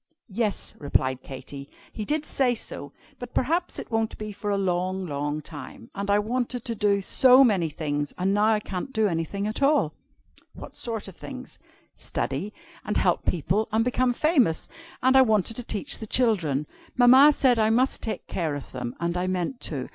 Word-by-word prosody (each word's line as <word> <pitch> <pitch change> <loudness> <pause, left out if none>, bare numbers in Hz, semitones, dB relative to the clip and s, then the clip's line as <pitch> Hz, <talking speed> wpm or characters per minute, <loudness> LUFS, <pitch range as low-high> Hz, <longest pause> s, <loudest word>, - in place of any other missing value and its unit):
"Yes," 215 -1 -2
replied 130 -3 0
Katy, 140 +1 -9 0.2
"he 215 - -5
did 305 +3 -1
say 255 -4 +1
so. - - -7 0.3
But 245 -1 -9
perhaps 335 +7 0
it - - -8
won't 225 -1 -1
be 215 0 -6
for 205 +1 -5
a 200 - +1
long, 185 0 -1
long 145 0 -3
time. 140 -7 -10
And 200 0 -4
I 200 - +4
wanted 240 +3 -2
to 235 - -1
do 200 -2 +1
so 255 +6 +6
many 195 -9 +2
things. 145 -1 -3
And 190 +2 +1
now 205 +1 +3
I 215 - +2
can't 195 +4 -5
do 220 -2 +2
anything 175 +3 -2
at 215 +5 -3
all!" 275 - +3 0.6
"What - - -10
sort 225 -4 -5
of 190 - -11
things?" - - -9 0.4
"Study, 145 +10 -3 0.3
and - - -2
help - - +1
people, 185 +6 0
and 225 +1 +2
become 250 0 +2
famous. 255 - +2 0.4
And 260 +1 +4
I 265 - +8
wanted 220 -3 +2
to 245 - -2
teach 230 +5 -1
the 220 - -7
children. 175 - +2 0.3
Mamma 260 +4 +8
said 255 -5 +3
I 215 0 +3
must 250 +4 +1
take 220 - -4
care 160 -5 -2
of 145 - -8
them, 125 -2 -5
and 170 +1 -1
I 180 +1 -1
meant 185 +7 -2
to. 135 -5 -4
205 Hz, 190 wpm, -25 LUFS, 165-245 Hz, 0.6 s, I